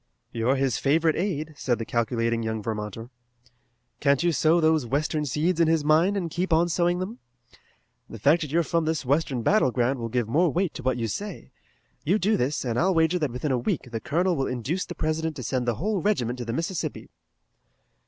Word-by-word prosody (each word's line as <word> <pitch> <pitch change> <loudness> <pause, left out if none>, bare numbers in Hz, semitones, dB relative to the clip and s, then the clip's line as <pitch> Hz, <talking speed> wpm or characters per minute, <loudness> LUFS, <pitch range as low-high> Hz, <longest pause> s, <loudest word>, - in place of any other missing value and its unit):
"You're 120 +3 +1
his 135 -3 0
favorite 160 +3 +2
aide," 160 -5 -2
said 125 -4 -1
the 115 - -4
calculating 115 0 0
young 110 -1 -3
Vermonter. 110 +2 -5 0.9
"Can't 140 +1 +2
you 175 - +3
sow 160 +3 +3
those 160 -2 +3
western 150 +5 -1
seeds 160 +6 0
in 165 - +4
his 160 -2 +2
mind 165 +7 +3
and 170 -4 -3
keep 180 +2 -2
on 165 +2 +3
sowing 175 +1 +1
them? 200 +7 -5 0.9
The - - -8
fact 145 +10 +3
that 150 -3 -4
you 170 +2 +3
are - - -1
from 165 0 0
this 155 -3 -1
western 135 -3 0
battle 215 - +3
ground 125 +2 0
will 115 -1 -4
give 120 -1 -1
more 160 +9 +3
weight 180 +1 0
to - - -7
what 130 0 0
you 115 -2 -1
say. 200 - -6 0.5
You 185 +7 +2
do 215 +2 +2
this, 135 +3 -1
and 120 -1 -1
I'll 185 +2 +2
wager 165 +2 +3
that 150 -4 0
within 125 +4 -3
a 125 - +1
week 125 +1 -2
the 115 - -3
Colonel 175 +8 0
will 135 -3 -1
induce 130 +9 -2
the 175 - -8
President 155 0 -1
to 130 - -6
send 125 +1 -2
the 120 - +1
whole 200 - -1
regiment 125 - 0
to 120 - -4
the 115 - -3
Mississippi." 165 +5 -4
150 Hz, 215 wpm, -25 LUFS, 125-170 Hz, 0.9 s, in